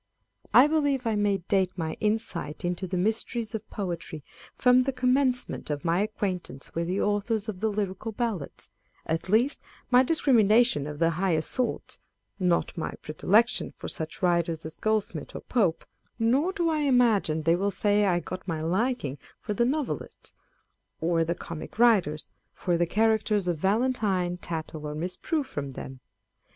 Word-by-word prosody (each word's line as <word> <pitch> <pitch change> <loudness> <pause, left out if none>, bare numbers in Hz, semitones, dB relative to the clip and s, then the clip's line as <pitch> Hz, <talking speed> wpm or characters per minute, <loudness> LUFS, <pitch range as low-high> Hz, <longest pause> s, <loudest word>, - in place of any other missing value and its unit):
I 255 - +8
believe 285 -4 +1
I 225 - +1
may 205 -1 +2
date 190 -2 +2
my 160 -2 -2
insight 210 -8 -2
into 180 +2 -2
the 180 +1 -2
mysteries 220 +3 -1
of 220 -1 -5
poetry 170 -5 -5 0.3
from 250 0 +5
the 265 +2 0
commencement 255 - 0
of 145 0 -3
my 170 +2 +2
acquaintance 190 -8 -3
with 170 0 -2
the 185 +3 -1
Authors 205 +1 0
of 205 -4 -5
the 220 - +1
Lyrical 205 +1 -3
Ballads; 220 - -4 0.3
at 165 +3 -2
least, 235 +8 +2 0.3
my 250 +1 +7
discrimi 265 -5 +3
nation 210 - +3
of 150 -1 -6
the 165 +1 +2
higher 165 -2 +1
sorts 250 +6 -2 0.4
â€" 180 - +2
not 170 - +1
my 165 - -3
predilection 205 +9 +2
for - - -7
such 160 +3 -4
writers 170 -2 +1
as 160 - -6
Goldsmith 210 -8 -2
or - - -5
Pope: 195 -10 0 0.3
nor 255 +10 +2
do 350 -4 -1
I 315 -1 +1
imagine 235 - +3
they 165 +2 +4
will 195 +3 0
say 205 +1 +2
I 175 -2 +2
got 185 +1 -7
my 165 -3 -2
liking 180 - -1 0.2
for 210 - -3
the 235 +3 +2
Novelists, 285 +2 -3 0.7
or 165 0 +2
the 170 +1 -1
comic 170 +3 -8
writers, 200 -11 +4
â€" - - -19 0.3
for 175 - -1
the 170 0 +1
characters 215 -1 +2
of 170 -3 0
Valentine, 195 -3 +1
Tattle, 160 -3 -5
or 150 - -5
Miss 175 +4 -3
Prue, 315 -3 -1
from 145 - -6
them. 130 0 -8
200 Hz, 170 wpm, -27 LUFS, 170-235 Hz, 0.7 s, I